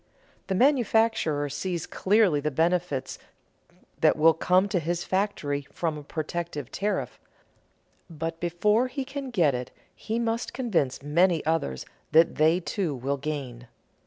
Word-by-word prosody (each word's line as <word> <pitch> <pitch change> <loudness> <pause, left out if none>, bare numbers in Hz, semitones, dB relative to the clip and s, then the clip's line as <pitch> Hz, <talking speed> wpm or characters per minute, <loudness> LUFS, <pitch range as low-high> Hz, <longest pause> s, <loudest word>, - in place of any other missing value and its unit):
The 190 - -1
manufacturer 225 - +2
sees 165 +4 -3
clearly 195 -6 +2
the 150 +1 -1
benefits 165 -1 -1 0.8
that - - +4
will 160 +1 +6
come 185 +4 +2
to 190 - +1
his 170 +2 -2
factory 150 -8 -1
from 165 -3 -2
a 150 - -7
protective 155 -2 -5
tariff, 205 +1 -2 0.9
but 165 0 -5
before 210 +8 +2
he 265 +1 -4
can 275 0 -6
get 170 - +2
it 125 0 -4 0.2
he 225 +1 -4
must 230 0 -2
convince 170 - -1
many 170 +2 +2
others 155 - -1 0.3
that 160 +1 +5
they 160 +3 +4
too 180 -4 -2
will 135 +3 -2
gain. 135 -4 -5
170 Hz, 135 wpm, -26 LUFS, 150-205 Hz, 0.9 s, will